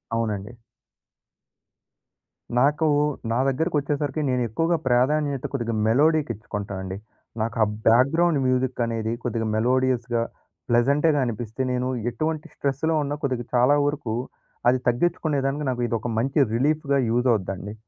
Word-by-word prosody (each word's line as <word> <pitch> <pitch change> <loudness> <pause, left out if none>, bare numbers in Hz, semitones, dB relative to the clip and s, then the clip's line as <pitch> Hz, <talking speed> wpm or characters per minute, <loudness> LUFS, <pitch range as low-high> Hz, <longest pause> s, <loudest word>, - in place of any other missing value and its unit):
అవునండి. 105 -2 -2 2.1
నాకు, 150 +4 +3 0.4
నా 120 - +1
దగ్గరకొచ్చేసరికి 150 0 -1
నేనేక్కువగా 130 +7 0
ప్రాధాన్యత 135 +2 +1
కొద్దిగా 120 -3 -2
మెలోడీకిచ్చుకుంటానండి. 110 -8 0 0.4
నాకు 115 0 -2
ఆ - - +4 0.2
బ్యాక్‌గ్రౌండ్ 140 +7 +4
మ్యూజికనేది 120 -3 0
కొద్దిగా 115 -2 -2
మెలోడియస్‌గా, 120 0 +1 0.5
ప్లెజెంటేగానిపిస్తే, 125 -2 +1
నేను 125 0 -1 0.2
ఎటువంటి 155 +2 -3
స్ట్రెస్‌లో 145 +4 0
ఉన్నా, 145 +1 -3
కొద్దిగా 125 -3 -1
చాలా 125 +4 +5
వరకు 145 -7 -2 0.5
అది 125 +1 +2
తగ్గించుకునేదానికి 140 +1 0
నాకు 120 -1 -2
ఇదొక 115 0 -2
మంచి 135 +5 0 0.2
రిలీఫ్‌గా 140 +2 +1
యూజవుద్దండి. 105 -5 0
130 Hz, 95 wpm, -24 LUFS, 115-145 Hz, 2.1 s, చాలా